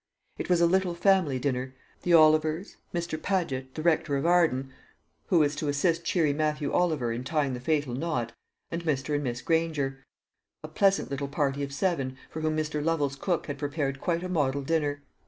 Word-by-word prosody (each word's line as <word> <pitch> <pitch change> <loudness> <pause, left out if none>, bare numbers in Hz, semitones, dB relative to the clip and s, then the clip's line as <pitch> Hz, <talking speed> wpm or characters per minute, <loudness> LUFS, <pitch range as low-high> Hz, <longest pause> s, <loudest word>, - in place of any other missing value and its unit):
It - - -4
was 175 -1 +3
a - - +6
little 180 0 +2
family 180 -7 +3
dinner 130 0 -2 0.3
the 175 -1 +4
Olivers, 155 +2 +3
Mr. 170 -2 -3
Padget, 135 -9 -2
the 155 - -4
rector 155 -4 +2
of 140 - -2
Arden, 160 -7 +2 0.5
who 180 - +3
was 150 -2 +3
to 150 - -2
assist 165 +4 +1
cheery 165 -4 +2
Matthew 150 0 -1
Oliver 155 -9 +1
in 120 +2 -3
tying 140 0 0
the 125 - -4
fatal 145 -2 0
knot, 125 -5 -2 0.4
and 170 0 -3
Mr. 150 -2 -1
and 145 0 0
Miss 120 -2 -3
Granger 155 -5 0 0.6
a - - -5
pleasant 195 -6 +2
little 140 0 -2
party 140 -1 -1
of 140 -1 -3
seven, 140 -4 -1
for 160 - -5
whom 155 0 0
Mr. 150 -1 -2
Lovel's 150 -4 0
cook 170 +5 -1
had 145 -2 -5
prepared 140 -2 -2
quite 170 0 0
a - - -3
model 140 -6 0
dinner. 145 -1 -1
150 Hz, 190 wpm, -28 LUFS, 135-170 Hz, 0.6 s, a